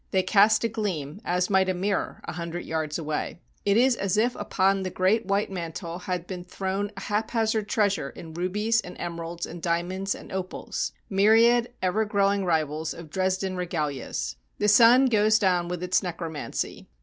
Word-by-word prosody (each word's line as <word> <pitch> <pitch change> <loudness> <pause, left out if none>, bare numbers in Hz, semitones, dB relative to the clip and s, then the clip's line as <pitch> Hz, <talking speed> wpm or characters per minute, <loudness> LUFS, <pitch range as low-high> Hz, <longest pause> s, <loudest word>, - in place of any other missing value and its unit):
They 190 -1 +2
cast 210 +4 +4
a - - +3
gleam, 200 - -4
as 180 +1 +1
might 190 -1 +4
a 185 - 0
mirror, 195 +2 -2
a - - -4
hundred 170 +1 -5
yards 155 -2 -2
away. 155 -1 -3 0.3
It 200 +1 +3
is 255 +1 +4
as 195 -1 -1
if 240 +3 +2
upon 195 -1 +1
the 185 - -2
great 185 +4 +1
white 200 0 0
mantle 170 -1 -5
had 180 -1 -3
been 180 -1 -6
thrown 190 +2 -3
haphazard 220 +1 -1
treasuries 200 -10 +1
in 160 -1 -9
rubies 210 +7 0
and 180 - -10
emeralds 170 0 -4
and 175 0 -9
dia 170 0 +1
monds 190 +2 -3
and - - -12
opals, 185 -1 -3
— - - -41
myriad 230 +4 +5
ever 190 +4 +2
growing 200 -1 +2
rivals 160 -2 -1
of 165 -3 -11
Dres 190 +1 +1
den 190 -1 -3
regalias. 150 - -3 0.2
The 210 - +1
sun 235 +5 +7
goes 215 -3 +4
down 180 -4 +2
with 180 0 -4
its 180 0 +2
necromancy. 165 -4 -4
185 Hz, 180 wpm, -26 LUFS, 170-205 Hz, 0.3 s, sun